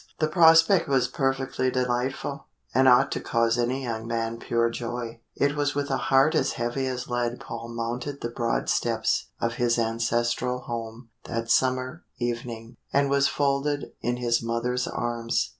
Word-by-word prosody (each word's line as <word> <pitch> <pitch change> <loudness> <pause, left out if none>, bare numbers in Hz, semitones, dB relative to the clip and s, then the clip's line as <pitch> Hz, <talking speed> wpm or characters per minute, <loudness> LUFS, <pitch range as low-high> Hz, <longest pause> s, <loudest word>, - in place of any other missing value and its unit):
The 155 - +1
prospect 165 +2 +6
was 130 -3 +3
perfectly 135 -1 -1
delightful, 125 0 -2 0.3
and 130 - +4
ought 130 +2 +5
to - - -1
cause 115 0 +1
any 125 +3 0
young 115 -2 -4
man 115 0 -2
pure 115 0 +1
joy. 115 -1 -5
It 145 +1 +1
was 145 -1 0
with 145 -1 -1
a 135 - +2
heart 135 +3 +5
as 150 -4 +1
heavy 120 +3 -2
as 125 -1 -4
lead 120 0 -1
Paul 115 0 -7
mounted 120 +5 -4
the 120 - -2
broad 120 -1 -1
steps - - 0
of 115 0 -2
his 120 -1 +3
ancestral 120 +2 0
home 115 0 -6 0.2
that 115 0 -3
summer 130 +4 +1
evening, 120 -1 -4
and 140 0 +2
was 140 0 +4
folded 145 0 0
in 120 0 -1
his 120 -1 +1
mother's 115 +2 -1
arms. 120 -1 -1
125 Hz, 160 wpm, -26 LUFS, 115-135 Hz, 0.3 s, prospect